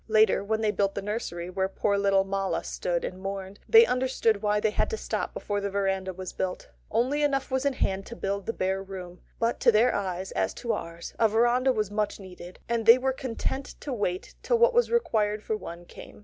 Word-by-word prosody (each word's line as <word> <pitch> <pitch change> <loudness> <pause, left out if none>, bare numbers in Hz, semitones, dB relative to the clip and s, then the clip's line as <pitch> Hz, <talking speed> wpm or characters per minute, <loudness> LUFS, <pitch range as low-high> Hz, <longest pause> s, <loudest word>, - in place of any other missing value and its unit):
Later, 215 -2 +4
when 220 +2 -1
they 215 -1 +2
built 195 -1 0
the 200 - -2
nursery 200 -5 -4
where 190 +1 -1
poor 200 +1 0
little 195 -1 +3
Mala 195 0 -1
stood 175 -1 -2
and 185 0 -6
mourned, 195 0 -5
they 455 +1 +9
understood 250 - +1
why 210 -1 +2
they 215 0 +1
had - - 0
to 445 - -3
stop - - -3
before 205 -1 -3
the 200 - -2
verandah 195 -1 -1
was 185 0 -7
built. 185 - -4 0.2
Only 270 +5 +1
enough 275 -2 0
was 265 +2 +1
in 280 - +1
hand 195 -5 -1
to 235 - -7
build 200 -2 -3
the - - +1
bare 190 -2 -1
room; 185 -2 -9 0.2
but 230 +1 0
to 240 - +5
their 230 +3 +4
eyes, 190 -1 -3
as - - -1
to 235 - -3
ours, 170 0 -6
a 225 - +5
verandah 240 +4 +3
was 215 -4 -1
much 210 0 -1
needed, 180 -2 -11
and 230 -1 -1
they 230 +2 +10
were 265 +1 0
content 265 +1 -4
to 280 - -4
wait 190 -5 -2
till 480 - +2
what 480 +2 +5
was 485 +1 +3
required 215 - +1
for 220 - -1
one 175 -4 -8
came. - - -12
210 Hz, 220 wpm, -27 LUFS, 190-240 Hz, 0.2 s, they